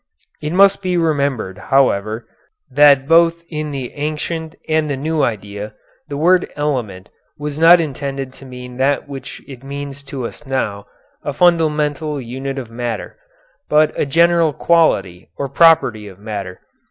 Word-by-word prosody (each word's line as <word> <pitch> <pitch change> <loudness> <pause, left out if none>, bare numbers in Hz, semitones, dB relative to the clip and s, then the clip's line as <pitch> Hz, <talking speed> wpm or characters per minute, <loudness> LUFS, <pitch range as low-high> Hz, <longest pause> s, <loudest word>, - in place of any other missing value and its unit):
It 150 - -3
must 195 +2 +4
be 180 -2 0
remembered, 140 - -1
however, 110 -3 +1 0.5
that 140 -2 +5
both 170 +1 +4
in 155 -2 -4
the 135 -4 -5
ancient 155 +2 -4
and 155 -1 +1
the 140 - -2
new 155 +3 -1
idea 105 -2 -3 0.3
the 145 -2 -5
word 180 +4 +3
'element' 120 -11 -3 0.3
was 150 0 -5
not 170 +2 +8
intended 135 -3 -4
to 135 - -14
mean 125 -1 -9
that 140 +2 +1
which 140 -1 -8
it 135 -2 -11
means 140 0 -7
to 135 -2 -5
us 135 - -8
now, 105 -7 -2 0.4
a 145 - -3
fundamental 150 -3 +1
unit 135 +2 -5
of 120 -4 -6
matter, 120 0 -4 0.5
but 150 0 +4
a - - -1
general 170 +1 +3
quality 100 - +1
or 140 - -2
property 135 -8 +4
of 95 -2 -12
matter. 100 -3 -6
140 Hz, 150 wpm, -18 LUFS, 125-155 Hz, 0.5 s, not